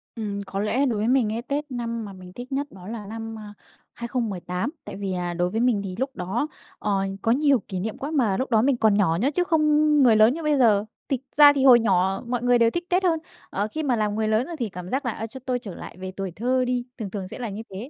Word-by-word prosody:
Ừm, 205 -3 -4
có 195 - -4
lẽ 240 +7 +1
đối 235 -5 0
với 220 - 0
mình 250 -4 +3
cái 225 +2 -2
Tết 285 +2 -4
năm 230 -2 -3
mà 200 - -8
mình 185 -1 -12
thích 245 +6 -9
nhất 280 +2 -1
đó 185 0 -12
là 220 -2 -6
năm, 225 +1 -6
a, 210 -1 -10 0.4
2018. 220 - -3
Tại - - -7
vì, 195 -1 -3
à, 175 -1 -2
đối 175 +1 0
với 220 +4 -2
mình 235 -5 +2
thì 185 -2 -5
lúc 265 0 -2
đó, 195 +11 -2 0.3
ờ, 200 -2 0 0.2
có 225 - +2
nhiều 280 -1 +4
kỷ 185 - -4
niệm 215 +4 -4
quá, 285 +3 -5
mà 235 -11 +2
lúc 260 - -2
đó 220 -2 +5
mình 260 0 +2
còn 220 -3 +4
nhỏ 165 -6 +3
nhớ 275 +5 +2
chứ 360 - +3
không 325 -3 +2 0.4
người 230 -3 +6
lớn 215 +3 +6
như 330 +2 -6
bây 300 -1 +2
giờ. 215 -5 +4 0.2
Tịch 265 -4 -1 0.2
ra 290 -1 +9
thì 270 -2 0
hồi 250 -3 +8
nhỏ 190 -2 +1
mọi 245 -1 -1
người 245 0 +4
đều 230 -1 +4
thích 345 +6 -4
Tết 360 +2 +2
hơn, 330 -3 +2 0.3
ờ, 205 +2 -1
khi 315 - -3
mà 260 -5 +2
làm 210 -1 0
người 220 0 0
lớn, 220 +4 +1
ơ, 340 - -6
thì 230 -3 -1
cảm 180 0 -8
giác 265 +4 -1
là 240 - 0
"À, 225 +1 -5
cho 265 +4 -10
tôi 250 -1 0
trở 200 -7 -8
lại - - -10
về 185 0 -6
tuổi 190 -1 -5
thơ 255 +6 0
đi", 245 -1 -1
thường 215 -5 -5
thường 190 -2 -5
sẽ - - -9
là 240 -3 -3
như 205 +2 -6
thế. 205 +8 -7
225 Hz, 280 wpm, -24 LUFS, 200-260 Hz, 0.4 s, ra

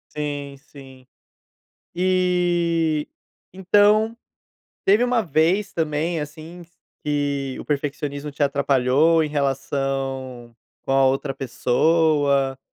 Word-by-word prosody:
Sim, 145 -2 -4
sim. 135 -3 -16 0.9
E, 175 -4 +1 0.5
então, 205 +4 +3 0.7
teve 210 +5 +4
uma 245 -2 +1
vez 175 +5 +1
também, 160 +1 -1
assim, 155 +4 -9
q - - -35 0.3
que 140 -2 -2
o - - -7
perfeccionismo 145 0 -3
te 145 0 -2
atrapalhou 140 +3 +2
em 155 - -3
relação 135 -3 -3 0.3
com - - -5
a 135 0 +4
outra 135 +1 0
pessoa, 140 +1 +1
150 Hz, 100 wpm, -22 LUFS, 135-170 Hz, 0.9 s, teve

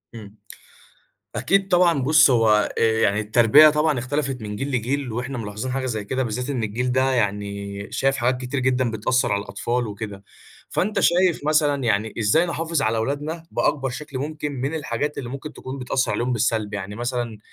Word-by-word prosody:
إمم. 105 -2 -11 1.0
أكيد 195 0 +1
طبعًا 175 -5 +3
بُص، 155 +2 +6
هو 110 -3 +3
آآ - - +1 0.2
يعني 105 0 +2
التربية 115 +8 +6
طبعًا 150 -2 +1
اختلفت 130 0 -2
من 105 -1 -5
جيل 135 +6 -3
لجيل، 125 0 -2
واحنا 125 +3 -4
ملاحظين 110 +3 -5
حاجة 130 0 -2
زي 110 -4 -3
كده، 130 +5 -1
بالذات 125 +3 -3
إن 125 -5 -2
الجيل 125 +4 -1
ده 130 +1 +2
يعني 100 -2 -3
شايف 135 0 +1
حاجات 125 +1 0
كتير 130 +2 -3
جدًا 130 -2 +1
بتأثّر 110 +4 0
على 100 - 0
الأطفال 120 +3 -2
وكده. 100 -1 -7 0.4
فأنت 205 +2 0
شايف 175 0 +3
مثلًا 145 -3 +2
يعني 110 0 0
إزاي 115 +11 +3
نحافظ 165 -2 -1
على 110 +1 +1
أولادنا 150 +7 -3
بأكبر 135 -3 0
شكل 135 +1 -6
ممكن 150 +1 -4
من 135 +3 -3
الحاجات 150 -1 -3
اللي 125 - -5
ممكن 140 +4 -7
تكون 130 +1 -8
بتأثّر 130 0 -1
عليهم 125 +2 -1
بالسلب؟ 110 -3 0
يعني 100 +1 -5
مثلًا 120 -2 -3
125 Hz, 180 wpm, -23 LUFS, 110-145 Hz, 1.0 s, بُص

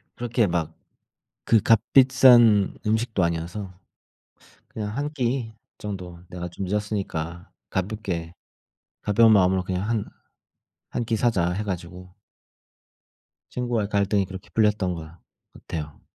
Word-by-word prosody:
그렇게 120 -2 0
막 85 -3 -2 0.8
그 115 -2 +5
값비싼 120 -2 +5
음식도 110 -2 +1
아니어서 85 +4 -3 0.9
그냥 105 -2 -5
1 145 +1 -1
끼 125 -4 -1 0.2
정도 90 -4 -7
내가 90 0 -6
좀 95 +3 -5
늦었으니까 95 -4 -3 0.2
가볍게 95 -4 -3 0.7
가벼운 110 +2 +5
마음으로 95 -2 +3
그냥 95 +3 -2
한 115 -3 0 0.8
1 120 - -2
끼 115 0 0
사자 100 -7 +1
해 100 +4 -2
가지고 90 -1 -6 1.4
친구와의 120 -4 -1
갈등이 100 -1 +1
그렇게 95 0 -10
풀렸던 105 -4 +2
것 80 -2 -8 0.4
같아요. 75 -3 -7
100 Hz, 240 characters per minute, -24 LUFS, 90-115 Hz, 1.4 s, 그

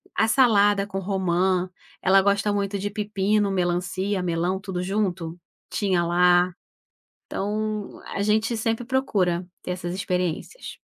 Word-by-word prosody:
a 220 - +3
salada 205 -5 +4
com 195 -1 -4
romã, 185 -1 0 0.3
ela 195 +1 +5
gosta 200 +1 +1
muito 200 0 -1
de 205 +1 -2
pepino, 205 -1 0
melancia, 185 +2 -1
melão 175 +2 -1
tudo 190 -2 -4
junto, 180 -4 -2 0.3
tinha 185 -4 +1
lá. 175 +1 +4 0.7
Então 215 +1 -3
a - - -3
gente 220 +3 +1
sempre 225 +2 -1
procura 195 -9 0 0.2
ter - - -4
essas 180 -1 -4
experiências. 180 - -3
195 Hz, 125 wpm, -24 LUFS, 180-210 Hz, 0.7 s, ela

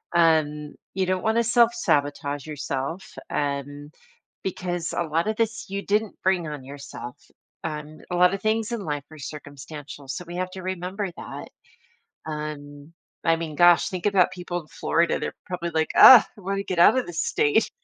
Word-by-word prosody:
um, 155 -3 +2 0.2
you 190 -1 0
don't 185 0 -1
wanna 225 +1 +2
self-sabotage 145 - +1
yourself, 145 +3 -4 0.2
and 145 0 -3 0.5
because 175 -2 -3
a 170 - 0
lot 165 +4 -1
of 215 - 0
this 225 -3 -2
you 200 0 -3
didn't 210 +1 -1
bring 185 -3 +1
on 145 -3 -6
yourself. 140 -1 -9 0.5
Um, 155 -1 -6
a 180 - -2
lot 180 +2 +5
of 195 - -3
things 220 +1 0
in 235 -3 -2
life 145 -5 -3
are 155 - -11
circumstantial, 145 0 -9
so 135 +7 -5
we 175 +1 -8
have 185 0 -2
to 185 - -8
remember 185 +1 -3
that. - - -8 0.8
Um, 150 0 -7 0.3
I 165 -1 +4
mean, 160 -2 -5
gosh, 175 0 +6
think 185 +1 -4
about 185 -2 +3
people 175 -1 -4
in - - -21
Florida, 170 +1 +1
they're - - -4
probably 170 -1 -3
like, 160 0 0
"Ugh, 245 -6 +11
I - - -13
want 195 +1 -2
to 200 - -3
get 185 -3 -3
out 215 +9 +7
of 255 - -1
the 175 - -7
state." 160 +4 +1
170 Hz, 180 wpm, -25 LUFS, 150-190 Hz, 0.8 s, Ugh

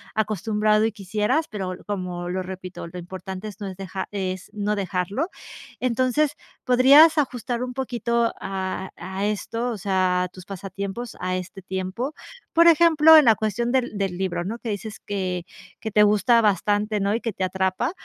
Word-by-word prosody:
acostumbrado 215 0 +1
y 225 - -1
quisieras, 210 - -1
pero 190 -3 -4
l 180 - -12
como 180 -3 -4
lo 185 +1 -2
repito, 185 -1 -7
lo 175 +2 -9
importante 185 +3 -7
es 205 +1 -13
no 205 - -5
es 190 - -6
deja 190 0 -5
es 185 -2 -4
no 210 0 -1
dejarlo, 195 - -1 0.5
entonces 255 +4 +1 0.3
podrías 280 +6 +7
ajustar 245 -4 -1
un 250 0 -3
poquito 235 -2 0
a 190 0 -4
a 190 +3 -4
esto, 230 +3 -2
o 225 - -4
sea, 185 -2 +1
a - - -2
tus 180 0 -13
pasatiempos 200 +4 -6
a 185 0 -1
este 185 +1 -6
tiempo, 190 - -4 0.4
por 335 +1 +6
ejemplo, 320 -1 +7
en 305 - +7
la 225 -2 +6
cuestión 220 +3 -1
del 250 -4 0
del 195 -3 -2
libro, 175 -2 -2
¿no?, 220 +5 -4
que 230 - -5
dices 210 +1 -5
que 185 -3 -3 0.4
que 220 - -4
te 210 +1 +5
gusta 210 +3 +4
bastante, 210 0 +1
¿no?, 200 +1 +1
y 225 - 0
que 230 -2 -3
te 190 - -3
atrapa, 190 +6 0
205 Hz, 180 wpm, -24 LUFS, 185-235 Hz, 0.5 s, podrías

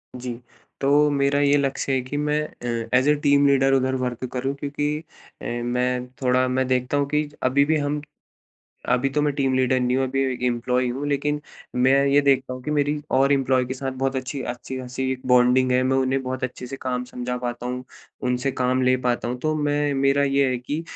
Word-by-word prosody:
जी, 125 -1 -5 0.5
तो 145 +2 +4
मेरा 140 0 +2
ये 145 0 +4
लक्ष्य 140 0 -1
है 130 - +1
कि 130 +3 -5
मैं 150 +1 0
अ, 115 -4 -5
एज़ 130 +3 +3
ए 150 - +5
टीम 140 0 +5
लीडर 135 -1 +3
उधर 130 0 +2
वर्क 125 0 -4
करूँ 135 +2 -1
क्योंकि 145 +1 -2 0.5
अ, - - -8
मैं 125 +1 -1
थोड़ा 130 0 +2
मैं 130 0 0
देखता 130 +2 0
हूँ 140 -1 +1
कि 150 0 0
अभी 140 +3 +3
भी 160 +1 +2
हम 145 0 -1 0.9
अभी 125 +2 +2
तो 150 - 0
मैं 145 0 +1
टीम 135 -2 +1
लीडर 130 0 +2
नहीं 125 0 +1
हूँ 135 - +2
अभी 135 +1 -1
ए - - -4
एम्प्लॉयी 125 +1 0
हूँ 135 +4 -3
लेकिन 145 +1 0 0.3
मैं 130 +2 +4
ये 140 +1 +4
देखता 135 -2 +2
हूँ 130 - -9
कि 150 - -4
मेरी 145 0 +1 0.2
और 135 +2 +4
इम्प्लॉयी 130 -2 +2
के 130 - -4
साथ 135 0 -4
बहुत 135 0 0
अच्छी 130 +1 -4
अच्छी-खासी 130 +1 -4
बॉन्डिंग 125 +1 +4
है, 125 0 +3
मैं 130 +1 +1
उन्हें 135 0 +1
बहुत 130 0 -3
अच्छे 125 0 -6
से 135 +2 -6
काम 125 -1 -2
समझा 125 0 -4
पाता 120 0 -4
हूँ, 125 +1 -4 0.4
उनसे 125 +1 0
काम 130 +1 +2
ले 130 0 +4
पाता 120 -1 0
हूँ। 125 +1 -3
तो 155 0 +1
मैं 145 0 +1
मेरा 135 +1 +2
ये 140 0 +2
है 125 - 0
कि 145 +6 -4
130 Hz, 210 wpm, -23 LUFS, 125-140 Hz, 0.9 s, ए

